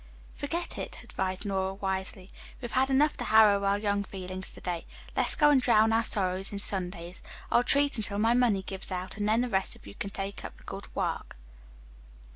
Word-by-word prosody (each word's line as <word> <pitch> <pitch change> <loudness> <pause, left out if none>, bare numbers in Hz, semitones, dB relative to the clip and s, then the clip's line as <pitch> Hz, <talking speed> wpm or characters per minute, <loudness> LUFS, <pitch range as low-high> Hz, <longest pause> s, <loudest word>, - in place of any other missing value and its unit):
"Forget 340 +4 -4
it," - - -5
advised 190 +2 -3
Nora 190 -1 -1
wisely. 190 -1 -3 0.3
"We've 240 -2 -6
had 265 +1 +2
enough 290 +3 +3
to 245 - -3
harrow 215 -2 +6
our 200 0 +2
young 205 -1 0
feelings 185 -1 -4
to - - -6
day. 175 -2 -4 0.3
Let's - - +3
go 295 -1 +5
and 275 -3 +5
drown 225 -3 +4
our 225 +1 +3
sorrows 190 -2 +1
in 200 - -4
sundaes. 180 -3 -2 0.3
I'll 240 - +5
treat 280 +2 +3
until 200 -2 -3
my 225 +3 +3
money 235 -6 +2
gives 190 0 -3
out, 185 +2 -4
and 205 0 0
then 225 +2 +3
the 250 - 0
rest 195 -5 0
of - - -18
you 100 - -10
can 200 - -5
take 195 0 -6
up - - -8
the - - -18
good - - -7
work." - - -2
200 Hz, 205 wpm, -29 LUFS, 190-235 Hz, 0.3 s, harrow